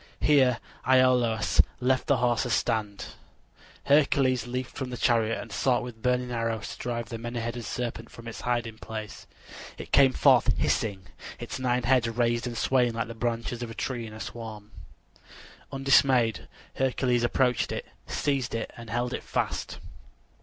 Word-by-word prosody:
Here 130 -5 +4 0.3
Iolaus 125 -4 +4 0.2
left 130 +1 +1
the 140 - +3
horses 120 -1 +1
stand. 105 -2 -1 0.8
Hercules 135 -4 +3
leaped 125 +1 -4
from 130 -2 -5
the 125 - -5
chariot 115 -2 +2
and 115 - -8
sought 125 +3 +1
with 120 -2 -9
burning 125 0 0
arrows 115 -2 -2
to - - -8
drive 120 -1 -3
the 115 - -5
many 120 +1 -4
headed 120 +1 -4
serpent 115 -2 -4
from 115 0 -12
its 115 - -7
hiding 120 -3 -2
place. 110 -2 -7 0.5
It - - -9
came 135 -2 +6
forth - - +4
hissing, 100 -4 0 0.3
its - - -6
nine 125 -1 0
heads 125 -2 +3
raised 120 +1 0
and 120 -1 -5
swaying 125 -1 +2
like 115 0 -3
the - - -5
branches 115 +1 -3
of 120 - -4
a 115 - -8
tree 120 -3 -3
in 110 - -10
a 110 - -9
storm. 110 -2 -8 1.0
Undismayed, 135 -4 +3 0.3
Hercules 125 -2 +1
approached 125 +1 +1
it, - - -4 0.2
seized 135 -5 -1
it, 115 - -4
and 115 -1 -10
held 120 +2 -1
it - - -3
fast. - - -3
120 Hz, 160 wpm, -27 LUFS, 115-125 Hz, 1.0 s, came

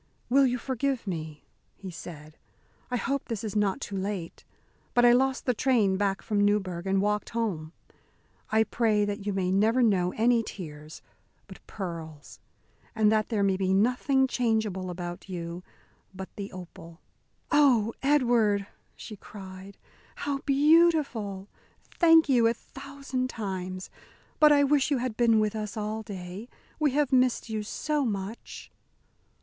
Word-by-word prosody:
"Will 270 +2 +5
you 250 0 0
forgive 260 0 -2
me?" 155 -5 -6 0.3
he 190 -2 -9
said. 155 -3 -10 0.5
"I 250 - -1
hope 275 +3 -2
this 225 -3 -4
is 215 -1 -4
not 205 -2 +1
too 200 - -6
late. 190 -3 -4 0.5
But 245 0 +5
I 240 - +8
lost 265 +2 +2
the 250 - +2
train 225 -6 +2
back 195 0 -1
from 205 -1 +1
Newburg 190 -3 0
and 195 0 +2
walked 210 0 -1
home. 170 -9 -2 0.8
I 220 0 +4
pray 220 -2 +1
that 205 0 -4
you - - +1
may 190 -2 -1
never 220 +6 +3
know 185 -5 +2
any 235 +1 +3
tears 155 -7 -9 0.4
but - - -14
pearls, 165 -6 -7 0.6
and 215 -1 +4
that 215 -1 +1
there 215 -4 0
may 195 -1 +2
be 190 0 +1
nothing 250 +5 +2
changeable 220 -7 -1
about 175 +1 -7
you 170 -1 -5 0.5
but 190 0 -9
the 200 -1 -6
opal." 170 -2 -11 0.5
"Oh, 255 -7 +4
Edward!" 240 -8 +2 0.3
she 215 - -9
cried, 190 -1 -11 0.4
"how 285 -1 -3
beautiful! 280 - +3 0.4
Thank 325 -2 +5
you 245 -4 +4
a 230 - +1
thousand 270 0 -5
times. 185 -4 -5 0.5
But 300 -1 +7
I 285 -1 +5
wish 285 0 +2
you 285 - +2
had 245 -2 -3
been 230 -2 +4
with 215 0 0
us 215 +1 -5
all 215 +1 -3
day. 195 +1 -8 0.3
We 305 -1 +3
have 290 -2 +1
missed 255 -2 +2
you 220 -1 -2
so 295 +7 -2
much!" 205 -1 -5
215 Hz, 150 wpm, -27 LUFS, 190-250 Hz, 0.8 s, I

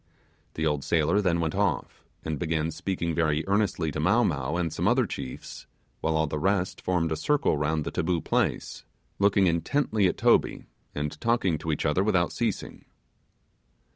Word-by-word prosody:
The 80 - -1
old 75 -3 0
sailor 85 +5 +2
then 85 -4 +1
went 80 -1 -1
off, 95 -8 -1 0.2
and 80 -3 -3
began 80 -1 -1
speaking 85 -1 -3
very 80 -2 +1
earnestly 95 -6 +1
to 75 - -4
Mow 100 +10 +3
Mow 75 - -1
and 85 -3 -1
some - - -1
other - - +3
chiefs, 65 - -7 0.3
while 80 0 0
all 80 - +2
the 75 0 -3
rest 95 +2 0
formed 85 -3 0
a - - +1
circle 140 - +1
round 75 +1 0
the - - -4
taboo 85 0 0
place, - - -1 0.4
looking 100 -1 +4
intently 100 - +1
at - - -2
Toby, - - +2 0.3
and 75 +1 -4
talking 115 -9 +1
to 80 +1 -3
each 75 - -2
other 85 +6 +2
without 90 -4 +2
ceasing. - - -3
85 Hz, 170 wpm, -27 LUFS, 75-95 Hz, 0.4 s, looking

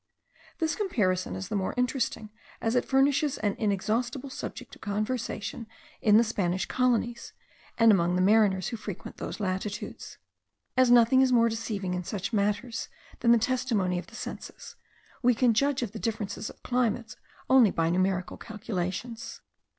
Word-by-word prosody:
This 320 0 0
comparison 185 - 0
is 95 0 -6
the - - -2
more 190 -2 -1
interesting, 250 -4 -1 0.3
as 225 - 0
it 245 - +2
furnishes 275 +1 +2
an 205 -2 -1
inexhaustible 235 +6 -1
subject - - -7
of - - -14
conversation 215 +1 -3 0.3
in 210 -1 +6
the 230 - +6
Spanish 185 -5 -1
colonies, 240 -2 0 0.4
and 230 -1 +7
among 175 -3 +3
the 180 - +2
mariners 200 -2 +3
who 230 - -4
frequent 205 -4 -8
those - - -6
latitudes. 200 +1 -4 0.6
As 255 -1 +4
nothing 240 +2 +6
is 260 -1 +3
more 230 -2 +5
deceiving 215 -4 -3
in 180 0 -2
such 200 +4 -4
matters 210 +3 -1 0.3
than 235 - +4
the 235 - +7
testimony 225 -7 0
of - - -9
the 225 - -14
senses, - - -8 0.5
we 250 -1 +4
can 240 0 +3
judge 275 +2 +1
of 220 - -4
the 220 - -7
difference 220 -3 -2
of - - -15
climates 240 -2 -1 0.3
only 260 -5 +6
by 165 -2 0
numerical 185 0 0
calculations. 215 +1 -5
225 Hz, 160 wpm, -28 LUFS, 195-245 Hz, 0.6 s, and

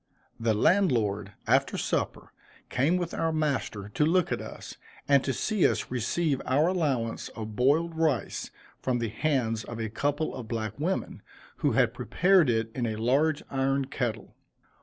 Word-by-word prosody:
The 115 -1 +1
landlord, 105 - +2
after - - +2
supper, - - -2 0.4
came 150 +8 +2
with 175 -2 -3
our 165 0 0
master 140 -10 -1
to 125 - 0
look 175 +3 +2
at - - -1
us, - - -9 0.3
and 140 -2 +5
to 135 - 0
see 210 - +2
us - - -2
receive 135 +4 0
our 140 +5 +2
allowance 140 -11 -1
of 110 -1 -6
boiled 155 +7 +2
rice 160 -6 0 0.3
from 130 -2 0
the 115 -2 -2
hands 115 -2 0
of 120 +1 -7
a 110 -1 -2
couple 145 +7 -1
of 120 -3 -7
black 110 0 -4
women, 180 +6 -2 0.4
who - - +1
had - - +3
prepared 185 -6 +3
it 115 -1 0
in 120 -3 -1
a 110 - -2
large 140 +7 +1
iron 135 0 +1
kettle. 120 -4 -4
135 Hz, 160 wpm, -28 LUFS, 115-155 Hz, 0.4 s, and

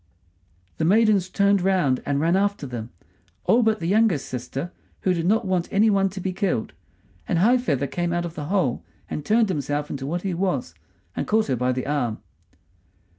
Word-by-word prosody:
The - - +1
maidens 200 0 +3
turned 200 -1 +3
round 180 -9 +2
and 140 0 +1
ran 165 +4 +2
after 200 -5 0
them; 120 -3 -6 0.5
all 240 - +4
but 220 -1 +2
the 165 - -4
youngest 195 -5 +2
sister, 130 +6 -5 0.3
who 185 - +2
did 170 -1 -1
not 220 +3 +2
want 185 -2 -1
any 215 +2 +4
one 195 -1 +2
to 190 +1 -7
be 185 0 -3
killed; 180 - -1 0.5
and - - +1
High 235 +9 +4
feather 145 - 0
came 175 +4 -2
out 175 0 -1
of 170 - -6
the 150 -3 -6
hole 150 -8 0 0.3
and 150 - -3
turned 220 +5 +3
himself 145 -3 -2
into 135 -1 -4
what 175 +4 -3
he 195 -2 -1
was, 170 - -1 0.4
and - - -3
caught 215 -5 +2
her 130 - +2
by 125 +1 0
the 130 0 -3
arm. 135 -7 -1
175 Hz, 195 wpm, -24 LUFS, 145-200 Hz, 0.5 s, all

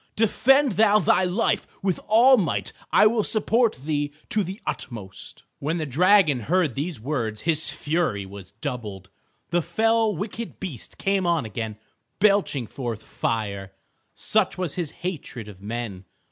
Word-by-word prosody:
Defend 270 +5 +4
thou 215 -1 +5
thy 190 -3 +3
life 185 +6 0 0.2
with 190 -3 0
all 235 +5 +7
might. 200 -9 -1 0.2
I - - +6
will 215 0 +3
support 225 +2 +2
thee 145 +1 -2 0.2
to 215 - +1
the 190 +3 -6
utmost." 105 -6 -7 0.2
When 155 +4 -1
the 160 - -2
dragon 165 0 +4
heard 160 - +1
these 150 +2 -4
words 115 -4 -3
his 160 -1 +4
fury 150 - -1
was 95 -1 -11
doubled. 105 -5 -6 0.4
The 175 0 +2
fell 220 +5 +1
wicked 215 +5 -6
beast 160 - -7
came 195 -2 0
on 165 -7 +1
again 110 0 -5 0.4
belching 200 - +2
forth 115 -2 -5
fire, 100 -4 -3 0.4
such 195 -4 +1
was 180 -5 -2
his 175 -5 -3 0.2
hatred 140 - -5
of 100 -3 -12
men. 105 -3 -5
160 Hz, 145 wpm, -24 LUFS, -, 0.4 s, all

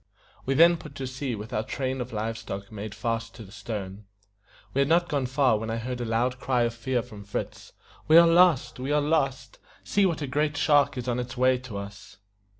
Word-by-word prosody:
We 135 - +1
then 170 +3 +6
put 150 -3 -12
to 135 - -4
sea 130 -1 -4
with 105 +1 -8
our 105 - +1
train 130 +3 -3
of 125 - -6
live 110 +1 -3
stock 100 -3 -7
made 105 0 -7
fast 115 -1 -3
to 115 - -9
the 95 - -14
stern. 100 -3 -6 0.7
We 140 - 0
had 140 - +2
not 170 +2 +3
gone 140 -3 -1
far 130 -4 +2
when 110 +1 -5
I 115 - -1
heard 125 +1 -4
a - - -2
loud 120 +3 0
cry 125 -2 +1
of 115 0 0
fear 120 +1 -2
from 105 -4 -11
Fritz, 100 - -6 0.3
"We 160 - +7
are 170 - +9
lost! 170 -6 +4
We 130 +3 -3
are 150 - +3
lost! 135 -3 -1 0.2
See 200 -1 +2
what 160 -4 -2
a - - -1
great 145 +2 -1
shark 145 -2 +3
is 125 0 -5
on 125 0 0
its 125 0 -5
way 130 0 +3
to 125 -5 -8
us!" 100 0 -9
125 Hz, 230 wpm, -26 LUFS, 115-140 Hz, 0.7 s, are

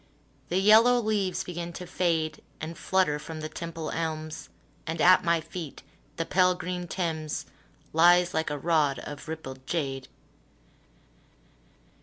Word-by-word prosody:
The 180 - +1
yellow 220 +5 +6
leaves 210 -5 0
begin 175 -1 -5
to 180 - -7
fade 160 -4 -1 0.2
And 160 +2 -5
flutter 185 -6 +1
from 160 +1 -7
the 155 - -4
Temple 165 0 -5
elms, 155 -1 -4 0.4
And 160 0 -3
at 185 +3 +6
my 170 -1 +3
feet 160 -4 -8 0.3
the 165 - -2
pale 180 0 +3
green 180 0 -4
Thames 160 -4 -3 0.5
Lies 175 +2 +5
like 160 0 0
a 145 - -2
rod 150 -2 +2
of 145 +2 -8
rippled 130 -5 -7
jade. 135 -5 -2
165 Hz, 135 wpm, -28 LUFS, 155-180 Hz, 0.5 s, yellow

